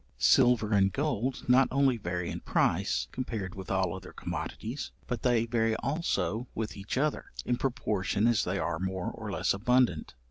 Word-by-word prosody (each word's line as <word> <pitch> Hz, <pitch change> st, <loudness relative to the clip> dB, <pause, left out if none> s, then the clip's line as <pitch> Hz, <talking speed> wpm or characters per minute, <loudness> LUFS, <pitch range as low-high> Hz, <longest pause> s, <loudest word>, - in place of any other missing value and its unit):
Silver 120 Hz, -4 st, +4 dB
and 95 Hz, -1 st, +4 dB
gold 135 Hz, -2 st, -2 dB
not 130 Hz, +2 st, +6 dB
only 135 Hz, -1 st, +3 dB
vary 90 Hz, -5 st, -3 dB
in -, -, -4 dB
price, -, -, +1 dB
compared 110 Hz, -7 st, -4 dB
with 95 Hz, -1 st, -8 dB
all 95 Hz, -2 st, +1 dB
other 95 Hz, -, -9 dB
commodities, 120 Hz, +6 st, -5 dB, 0.2 s
but 120 Hz, -3 st, -3 dB
they 120 Hz, -2 st, +2 dB
vary 115 Hz, -1 st, +1 dB
also 135 Hz, -5 st, -1 dB
with 110 Hz, -1 st, -3 dB
each 100 Hz, +5 st, -4 dB
other, 150 Hz, +2 st, 0 dB, 0.2 s
in 125 Hz, -, +1 dB
proportion 105 Hz, -5 st, 0 dB
as 115 Hz, -3 st, +3 dB
they 90 Hz, +2 st, -1 dB
are 85 Hz, -2 st, -1 dB
more 95 Hz, -1 st, -2 dB
or -, -, -7 dB
less -, -, +1 dB
abundant. 125 Hz, -, +1 dB
115 Hz, 170 wpm, -30 LUFS, 95-125 Hz, 0.2 s, not